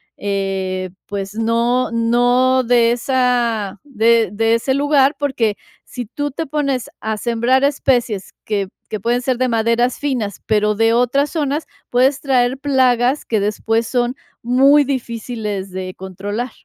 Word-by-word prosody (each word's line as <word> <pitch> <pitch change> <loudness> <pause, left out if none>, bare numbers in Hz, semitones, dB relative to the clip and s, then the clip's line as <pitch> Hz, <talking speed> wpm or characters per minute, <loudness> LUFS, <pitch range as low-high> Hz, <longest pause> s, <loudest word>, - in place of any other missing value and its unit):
eh, 190 -2 -2 0.2
pues, 200 0 -5
no 235 +2 +1
no 245 +3 +2
de 235 -1 +3
esa 240 -5 0
de 230 -5 +2
de 225 +2 +2
ese 265 +3 0
lugar. 285 0 +3
Porque 250 -7 0 0.3
si 245 -2 -7
tú 290 +6 -4
te 325 +4 -4
pones 275 -3 -1
a 220 0 -2
sembrar 240 +4 +1
especies 245 -7 0
que 200 -3 -2 0.2
que 215 - -3
pueden 240 +4 0
ser 255 -2 -1
de 255 - +1
maderas 230 +1 +1
finas, 245 -9 -2
pero 210 -1 +2
de 225 +2 +3
otras 255 +4 +2
zonas, 300 -1 -1 0.2
puedes 265 +3 +3
traer 255 -2 +1
plagas 260 -1 +2
que 220 - 0
después 220 +2 0
son 245 0 0 0.3
muy 275 +4 +5
difíciles 230 -6 -4
de 185 0 -5
controlar. 205 +6 -5
240 Hz, 140 wpm, -18 LUFS, 215-260 Hz, 0.3 s, muy